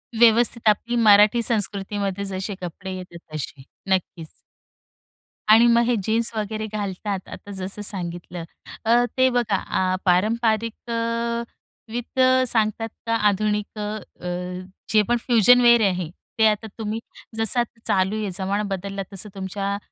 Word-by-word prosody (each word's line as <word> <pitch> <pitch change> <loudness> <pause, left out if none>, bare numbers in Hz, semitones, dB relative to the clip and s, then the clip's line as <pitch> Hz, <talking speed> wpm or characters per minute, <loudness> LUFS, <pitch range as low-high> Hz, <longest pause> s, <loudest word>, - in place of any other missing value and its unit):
व्यवस्थित 230 0 +4
आपली 235 +3 0
मराठी 215 +1 +6
संस्कृतीमध्ये 200 -2 -1
जसे 190 +1 -4
कपडे 185 +2 -6
येतात 175 -3 -11
तसे. 140 -2 -6 0.3
नक्कीच. 180 -3 -1 1.2
आणि 230 +2 +8
मग 235 0 +5
हे 245 -1 +2
जीन्स 225 +3 +1
वगैरे 215 0 -3
घालतात 200 -1 -3
आता 205 - -10
जसं 195 +3 -5
सांगितलं. 175 -3 -5 0.4
अ, 240 +2 +4
ते 260 0 +5
बघा 225 -5 +1
आ 185 0 0
पारंपरिक 220 +5 +1
अ, 230 0 -1 0.5
विथ 245 +2 -5 0.3
सांगतात 225 0 0 0.2
का 230 - +2
आधुनिक 210 +1 -1
अ, 210 -3 -6 0.6
जे 215 - +6
पण 240 - +3
फ्युजन 245 +1 +6
वेअर 235 -1 +6
आहे 180 -3 -3 0.3
ते 220 - +6
आता 215 +1 0
तुम्ही 220 0 -3 0.4
जसं 225 +2 +1
आता 235 -1 -3
चालू 190 +2 +2
आहे 210 - -2
जमाना 200 +2 -1
बदलला. 195 +1 -5
तसं 195 +2 -6
तुमच्या 195 +1 -3
210 Hz, 135 wpm, -23 LUFS, 190-230 Hz, 1.2 s, आणि